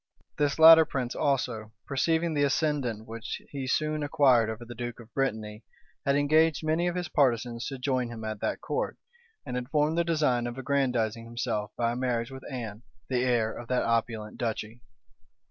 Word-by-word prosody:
This 145 Hz, -1 st, +1 dB
latter 160 Hz, 0 st, +10 dB
prince 130 Hz, -5 st, -3 dB
also, 120 Hz, -6 st, -1 dB
perceiving 160 Hz, +4 st, +1 dB
the 145 Hz, -, +1 dB
ascendant 140 Hz, -6 st, 0 dB
which 115 Hz, 0 st, -6 dB
he 135 Hz, -2 st, -4 dB
soon 155 Hz, +3 st, 0 dB
acquired 140 Hz, -6 st, +4 dB
over 110 Hz, +2 st, -6 dB
the 120 Hz, -, -8 dB
duke 120 Hz, 0 st, -6 dB
of 115 Hz, -1 st, -14 dB
Brittany, 110 Hz, -5 st, -2 dB, 0.4 s
had 140 Hz, -, +4 dB
engaged 155 Hz, +2 st, +3 dB
many 160 Hz, +3 st, +1 dB
of 175 Hz, -, -1 dB
his 180 Hz, -1 st, -2 dB
partisans 120 Hz, -5 st, +1 dB
to 135 Hz, -, -5 dB
join 130 Hz, -2 st, -1 dB
him 115 Hz, -2 st, -7 dB
at 110 Hz, -1 st, -4 dB
that -, -, -2 dB
court, -, -, -2 dB, 0.5 s
and -, -, -4 dB
had 125 Hz, 0 st, -4 dB
formed 150 Hz, +2 st, +2 dB
the -, -, +3 dB
design 150 Hz, -8 st, +1 dB
of 120 Hz, +1 st, -6 dB
aggrandizing 125 Hz, -4 st, 0 dB
himself 115 Hz, -3 st, -3 dB
by 115 Hz, -1 st, +1 dB
a -, -, -3 dB
marriage 125 Hz, -1 st, -1 dB
with 130 Hz, 0 st, -8 dB
Anne, 115 Hz, -4 st, -5 dB, 0.3 s
the 125 Hz, -1 st, +1 dB
heir 120 Hz, -3 st, +1 dB
of 120 Hz, -, -8 dB
that 125 Hz, +1 st, +1 dB
opulent 115 Hz, -2 st, -1 dB
duchy. 115 Hz, 0 st, -3 dB
125 Hz, 180 wpm, -28 LUFS, 115-145 Hz, 0.5 s, latter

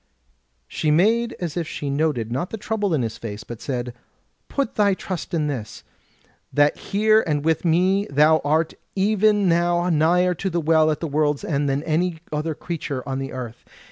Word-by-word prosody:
She 155 Hz, -, -2 dB
made 225 Hz, +9 st, +3 dB
as 170 Hz, -4 st, -4 dB
if 170 Hz, -3 st, -2 dB
she 145 Hz, -2 st, -4 dB
noted 140 Hz, -6 st, 0 dB
not 135 Hz, +9 st, -2 dB
the 225 Hz, -, -5 dB
trouble 205 Hz, -4 st, -1 dB
in 135 Hz, -, 0 dB
his 110 Hz, -1 st, -4 dB
face, 110 Hz, -1 st, -6 dB
but 120 Hz, -1 st, -9 dB
said: 125 Hz, -3 st, -3 dB, 0.6 s
"Put 275 Hz, -4 st, -1 dB
thy 200 Hz, -2 st, +3 dB
trust 185 Hz, -3 st, -5 dB
in 160 Hz, -3 st, 0 dB
this, 125 Hz, -7 st, -5 dB, 0.7 s
that 145 Hz, 0 st, +3 dB
here 215 Hz, +2 st, +2 dB
and 150 Hz, -1 st, -1 dB
with 160 Hz, 0 st, +1 dB
me 185 Hz, +4 st, +2 dB
thou 150 Hz, +3 st, +4 dB
art 155 Hz, +3 st, +1 dB, 0.2 s
even 205 Hz, 0 st, +3 dB
now 175 Hz, +1 st, +2 dB
nigher 175 Hz, +3 st, +3 dB
to 195 Hz, -, -1 dB
the 170 Hz, -1 st, -1 dB
Well 160 Hz, -1 st, +3 dB
at 150 Hz, -, -1 dB
the 165 Hz, -, -2 dB
World's 150 Hz, -1 st, 0 dB
End 145 Hz, -2 st, 0 dB
than 135 Hz, +2 st, -1 dB
any 165 Hz, +2 st, 0 dB
other 155 Hz, +1 st, -2 dB
creature 145 Hz, -7 st, -5 dB
on 135 Hz, 0 st, -2 dB
the 135 Hz, 0 st, -5 dB
earth. 125 Hz, -2 st, -7 dB
160 Hz, 185 wpm, -22 LUFS, 145-180 Hz, 0.7 s, thou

